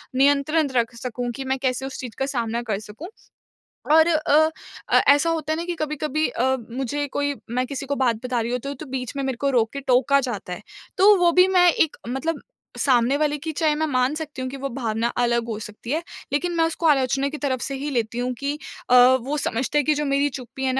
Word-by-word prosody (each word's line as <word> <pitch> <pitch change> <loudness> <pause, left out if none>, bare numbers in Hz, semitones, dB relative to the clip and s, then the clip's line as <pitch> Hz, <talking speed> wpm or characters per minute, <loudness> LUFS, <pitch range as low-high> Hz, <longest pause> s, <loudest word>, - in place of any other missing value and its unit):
नियंत्रण 285 +3 +3
रख 235 -1 +1
सकूँ 245 +1 -4
कि 270 - -5
मैं 265 0 0
कैसे 260 0 -1
उस 270 - -6
चीज़ 245 -4 -7
का 270 - +1
सामना 235 -4 -2
कर 195 - 0
सकूँ। 215 +10 -10 0.9
और 320 +1 +6
अ 315 -1 +3 0.4
अ, - - +6
ऐसा 290 +4 +5
होता 315 -2 -1
है - - -2
ना 335 - -3
कि 350 - -3
कभी-कभी 305 0 -1
अ, 260 +2 +1 0.2
मुझे 270 +3 -2
कोई 285 0 0 0.2
मैं 250 +2 0
किसी 275 0 -5
को 280 +1 -2
बात 250 -4 +2
बता 250 -1 -1
रही 230 +1 -3
हूँ 250 - -1
तो 275 +3 -5
तो 285 +3 -9
बीच 255 0 -4
में 275 - -1
मेरे 265 -1 -1
को 280 - +2
रोक 230 -4 +2
के 280 - -4
टोका 265 +2 +3
जाता 215 -8 -4
है। 195 - -8 0.4
तो 405 +2 +7
वो 350 -1 +4
भी 365 +2 +5
मैं 360 -2 +5
एक 315 - +1
मतलब 285 +6 -2 0.4
सामने 255 0 +3
वाले 295 0 0
की 320 +3 -5
चाहे 310 -1 +1
मैं 315 +1 0
मान 255 +1 +1
सकती 310 -4 -6
हूँ 255 - -3
कि 275 - -7
वो 275 +1 -4
भावना 230 -3 -1
अलग 235 -1 +1
हो 225 -2 -3
सकती 215 +3 -8
है, 315 +3 0 0.3
लेकिन 350 +5 0
मैं 330 - +3
उसको 330 +1 -3
आलोचना 270 -1 +2
की 300 - -6
तरफ़ 260 -4 -2
से 275 - -3
ही 280 +2 -4
लेती 235 -4 -2
हूँ 250 +1 -1
कि 280 +1 -2 0.3
अ, 250 - +5 0.3
वो 285 +5 -3
समझते 260 +2 -1
हैं 295 - +2
कि 305 - +3
जो 295 0 -1
मेरी 280 +1 +1
चुप्पी 260 0 -8
है 260 - +1
275 Hz, 240 wpm, -23 LUFS, 250-300 Hz, 0.9 s, तो